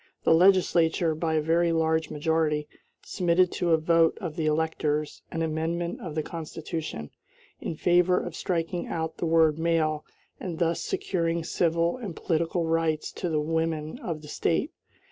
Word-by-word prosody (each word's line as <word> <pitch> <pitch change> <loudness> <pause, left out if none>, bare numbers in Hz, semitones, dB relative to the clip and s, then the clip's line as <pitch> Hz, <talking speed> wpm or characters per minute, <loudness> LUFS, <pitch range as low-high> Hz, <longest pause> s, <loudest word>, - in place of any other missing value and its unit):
The - - +5
legislature, 170 -2 +4
by 160 0 -1
a 155 - +2
very 170 +2 +2
large 160 -1 +1
majority, 150 -1 0 0.4
submitted 180 -1 +2
to 175 - -1
a 165 - +5
vote 165 +1 +3
of 170 -7 -5
the 160 -2 -1
electors 155 -1 -1
an 165 - -2
amendment 165 +2 -2
of 160 -5 -6
the 155 - 0
Constitution, 160 - -6 0.5
in 165 - -4
favor 180 +2 +3
of 175 -2 -6
striking 175 0 -2
out 160 -1 -3
the 170 - -1
word 160 -1 +4
"male" 160 -2 +1 0.4
and 175 -4 -5
thus 170 0 0
securing 175 - -1
civil 170 +2 +1
and 205 -9 -6
political 165 0 0
rights 160 -1 0
to 180 - -4
the 155 -2 +1
women 160 +3 -2
of 165 - -5
the - - -10
State. 170 - 0
165 Hz, 160 wpm, -27 LUFS, 160-170 Hz, 0.5 s, The